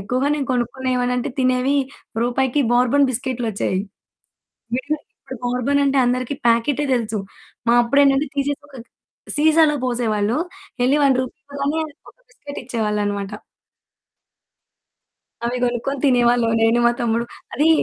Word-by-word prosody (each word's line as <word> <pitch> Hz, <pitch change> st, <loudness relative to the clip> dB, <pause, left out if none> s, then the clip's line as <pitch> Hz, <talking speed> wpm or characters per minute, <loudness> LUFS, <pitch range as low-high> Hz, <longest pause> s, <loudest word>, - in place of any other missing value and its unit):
ఎక్కువగా 250 Hz, +8 st, 0 dB
నేను 285 Hz, -2 st, -2 dB
కొనుక్కునేవాన్ని 250 Hz, 0 st, -1 dB
అంటే 255 Hz, +3 st, -2 dB
తినేవి 255 Hz, +2 st, +2 dB, 0.5 s
రూపాయికి 260 Hz, +3 st, +1 dB
బోర్బన్ 250 Hz, +3 st, +4 dB
బిస్కెట్‌లు 250 Hz, -1 st, -2 dB
వచ్చేవి 190 Hz, -2 st, -1 dB, 1.0 s
విడిగా. 290 Hz, +4 st, -2 dB, 0.2 s
ఇప్పుడు 265 Hz, -1 st, -9 dB
బోర్బన్ 250 Hz, +4 st, +1 dB
అంటే 275 Hz, 0 st, +2 dB
అందరికి 255 Hz, +2 st, -1 dB
ప్యాకెటే 240 Hz, +5 st, +2 dB
తెలుసు. 225 Hz, -3 st, -1 dB, 0.5 s
మా 235 Hz, -, +5 dB
అప్పుడేంటంటే 280 Hz, +3 st, +3 dB
తీసేసి 280 Hz, +1 st, -1 dB
ఒక 280 Hz, -, -14 dB
గ్ -, -, -38 dB, 0.5 s
సీసాలో 310 Hz, 0 st, +4 dB
పోసేవాళ్ళు. 225 Hz, -2 st, 0 dB, 0.5 s
ఎళ్లి 285 Hz, +3 st, +3 dB
1 270 Hz, -2 st, +4 dB
రూపీ 255 Hz, +3 st, -6 dB
ఇవ్వగానే 285 Hz, +2 st, -2 dB, 0.3 s
ఒక -, -, -22 dB
బిస్కిట్ 290 Hz, -13 st, -9 dB
ఇచ్చేవాళ్ళనమాట. 210 Hz, -4 st, -2 dB, 2.2 s
అవి 245 Hz, +1 st, -1 dB
కొనుక్కొని 245 Hz, +3 st, -1 dB
తినేవాళ్ళం. 240 Hz, -2 st, +3 dB
నేను 225 Hz, +1 st, +4 dB
మా -, -, +5 dB
తమ్ముడు. 235 Hz, 0 st, +1 dB, 0.3 s
అది 295 Hz, +5 st, +3 dB
250 Hz, 125 wpm, -21 LUFS, 235-280 Hz, 2.2 s, మా